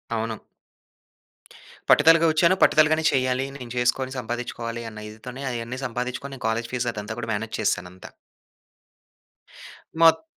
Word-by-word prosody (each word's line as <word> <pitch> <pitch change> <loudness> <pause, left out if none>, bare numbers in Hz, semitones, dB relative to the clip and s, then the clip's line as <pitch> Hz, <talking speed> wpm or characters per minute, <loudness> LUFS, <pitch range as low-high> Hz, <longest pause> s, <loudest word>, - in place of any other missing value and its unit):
అవును. 110 -1 -3 1.5
పట్టుదలగా 165 +2 +6
వచ్చాను. 170 +3 +4
పట్టుదలగానే 155 +1 +4
చేయాలి. 130 0 +1
నేను 125 -3 -9
చేసుకొని 130 +2 0
సంపాదించుకోవాలి. 120 -1 -5
అన్న 105 0 -9
ఇదితోనే 125 +5 -9
అయన్నీ 120 +2 -5
సంపాదించుకొని, 125 +3 -5
నేను 125 - -8
కాలేజీ 115 +1 -1
ఫీజ్ 125 -1 -1
అదంతా 105 +1 -5
కూడా - - -5
మేనేజ్ 110 +1 -4
చేశాను 90 -4 0
అంతా. 95 - -12 1.9
మొత్ 165 - +6
125 Hz, 120 wpm, -24 LUFS, 115-135 Hz, 1.9 s, పట్టుదలగా